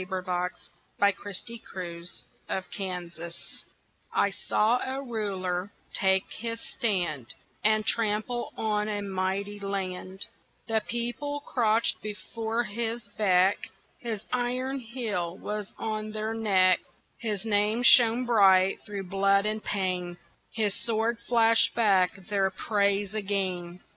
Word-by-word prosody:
VERSE: 180 -1 -3 0.3
THE 200 0 +5 0.6
THREE 170 -2 -6 0.7
RULERS 170 -3 -6 0.5
I 200 - +2
saw 220 +4 +2
a 265 +1 -3
Ruler 195 -5 -2 0.2
take 190 0 +3
his 230 0 -4
stand 175 - -2 0.3
And 215 0 +3
trample 225 +2 0
on 210 -1 0
a 205 -1 -2
mighty 195 +1 -2
land; 190 -1 -4 0.4
The 220 -1 +2
People 240 +5 -2
crouched 230 -4 +2
before 225 +2 -3
his 230 +1 -3
beck, 190 -1 +3 0.3
His 225 -4 -4
iron 250 +2 -1
heel 220 -8 -3
was 210 -1 -4
on 215 -1 -3
their 215 +1 -2
neck, 190 -5 +4 0.4
His 215 -3 -3
name 215 +2 +2
shone 240 0 +6
bright 195 -5 +5
through 205 -2 -5
blood 195 +2 +3
and 215 0 -1
pain, 180 -3 -2 0.3
His 215 -3 0
sword 230 +1 0
flashed 230 -1 +3
back 195 -6 +4
their 195 -1 +1
praise 200 0 0
again. 190 -4 -2
205 Hz, 115 wpm, -28 LUFS, 190-225 Hz, 0.7 s, shone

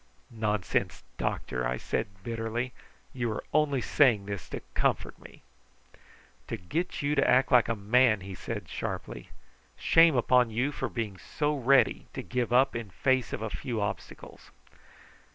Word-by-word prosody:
"Nonsense, 105 -4 -1 0.2
doctor!" 60 -1 -2
I 60 +1 -1
said 110 - -2 0.2
bitterly. 115 +2 -3 0.4
"You 120 -3 -2
are - - -5
only 145 -3 +2
saying 120 -7 +3
this 100 -3 -6
to - - -5
comfort - - 0
me." - - -15 1.0
"To 115 - -3
get 150 - -3
you 145 +1 +1
to 140 -1 +2
act 130 +2 +4
like 125 -2 +6
a 115 - +1
man," 110 +1 +3
he 95 +1 -8
said - - -6
sharply. - - -5 0.5
"Shame 165 -2 +5
upon 125 0 +4
you 120 +6 0
for - - -3
being 105 -6 -4
so 150 0 -1
ready 135 0 +3
to - - -4
give 125 -1 -2
up 130 +2 +4
in 115 -3 -4
face 130 +6 +1
of - - -4
a 110 - -3
few 120 -3 -3
obstacles!" 100 -1 -6
120 Hz, 155 wpm, -29 LUFS, 105-130 Hz, 1.0 s, like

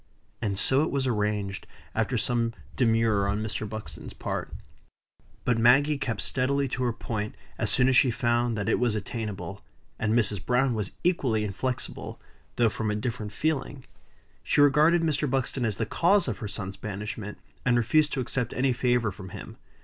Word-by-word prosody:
And 100 -3 -1
so 130 +7 +3
it 155 - +1
was 140 -1 0
arranged, 105 -4 -1 0.3
after - - 0
some 115 -1 0 0.2
demur 115 -4 +3
on 105 +2 -1
Mr. 110 -1 -3
Buxton's 110 0 -7
part. - - -3 1.0
But 120 -2 +2
Maggie 140 +5 +5
kept 115 -6 -2
steadily 140 +2 +1
to 125 - -3
her 120 - +2
point 110 -2 -4 0.2
as - - 0
soon 125 - +4
as 130 - +4
she 125 - +6
found 120 0 +1
that 100 - -2
it - - +2
was 120 -3 +2
attainable; 100 -3 -5 0.4
and 110 +1 +1
Mrs. 105 -4 +1
Browne 125 +1 +2
was 105 -3 -3
equally 130 -12 +2
inflexible, 120 +5 -4 0.4
though 120 - +4
from 110 0 -2
a 105 - 0
different 105 -2 -3
feeling. 140 +1 -2 0.6
She - - 0
regarded 150 +4 +5
Mr. 150 -2 +1
Buxton 130 -1 0
as 110 -3 0
the 115 - 0
cause 180 - +3
of - - -3
her 110 - -4
son's 95 -2 -5
banishment, 105 0 -5 0.3
and 125 -1 +3
refused 145 +6 +3
to 135 - 0
accept 125 -1 -2
of - - -8
any 130 0 +3
favor 120 -3 +1
from 95 -1 -10
him. - - -9
120 Hz, 180 wpm, -27 LUFS, 105-130 Hz, 1.0 s, she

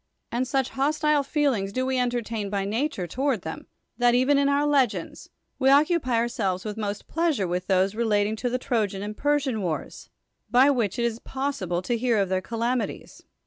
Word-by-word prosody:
And 250 +2 -1
such 265 -1 0
hos 285 +3 0
tile 300 -1 +3
feelings 275 -9 0
do 255 +5 -1
we 260 -1 0
entertain 235 -4 -2
by 200 -1 -1
nature 220 -1 -1
toward 255 - -1
theiii. 160 - -7 0.3
that 245 0 +4
even 270 +3 +3
in 280 0 +3
our 285 +1 +2
legends, 275 -6 0 0.3
Ave 265 -1 +4
occupy 290 -2 +3
our 230 +1 +2
selves 195 -6 -2
with 210 -1 -4
most 210 -2 -4
])leasure 320 - +1
with 180 +1 -3
those 190 +1 +2
relating 215 -2 +1
to 245 - -1
the 250 - 0
Tr(\ian 210 -6 -1
and 210 +1 -5
Persian 290 -3 0
v,'ars, 160 -6 -4 0.4
by 255 +5 +5
which 230 -8 0
it 235 - +1
is 230 -1 -2
pos 275 +3 -3
sible 180 -1 -2
to 240 - 0
licar 235 -2 +1
of 195 -2 +1
tht>ir 185 0 0
calamities. 230 -1 -3
240 Hz, 195 wpm, -25 LUFS, 205-270 Hz, 0.4 s, by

